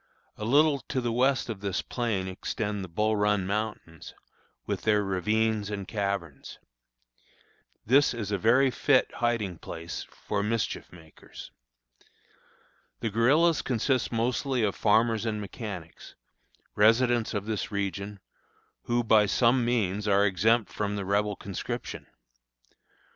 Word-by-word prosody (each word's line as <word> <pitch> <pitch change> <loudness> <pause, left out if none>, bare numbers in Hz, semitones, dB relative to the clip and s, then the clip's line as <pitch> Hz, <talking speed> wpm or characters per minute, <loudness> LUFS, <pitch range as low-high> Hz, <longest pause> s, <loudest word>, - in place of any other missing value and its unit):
A 105 - -6
little 145 +4 +4
to 130 - 0
the 120 -2 -1
west 130 +3 +2
of 110 -4 -5
this 100 -2 -2
plain 110 -6 -2
extend 105 +2 -3
the - - -6
Bull 110 +6 0
Run 105 -2 +1
Mountains, 105 -5 -4 0.5
with - - -3
their 105 -1 +2
ravines 105 +3 0
and 100 -2 -5
caverns. 100 -8 -4 1.3
This 140 +6 +4
is 110 -4 -4
a 100 - +1
very 125 +6 +4
fit 130 +1 +2
hiding 110 -8 -1
place 85 0 -7 0.2
for 100 -1 0
mischief 110 +1 -2
makers. 80 -3 -13 1.5
The 115 - -2
guerillas 145 +9 +3
consist 130 +1 0
mostly 120 +2 0
of 100 -2 +1
farmers 110 +1 +2
and 105 -1 -2
mechanics, 100 -5 -8 0.6
residents 115 +2 +3
of 100 -1 -2
this 110 -1 -3
region, 100 0 -4 0.6
who, 120 0 +1
by 110 -2 +4
some 120 +4 +3
means, 105 -4 0
are 100 0 +4
exempt 105 +2 +2
from 105 -1 -2
the 100 -1 -4
Rebel 100 +1 0
conscription. 100 -2 -6
105 Hz, 130 wpm, -28 LUFS, 100-120 Hz, 1.5 s, little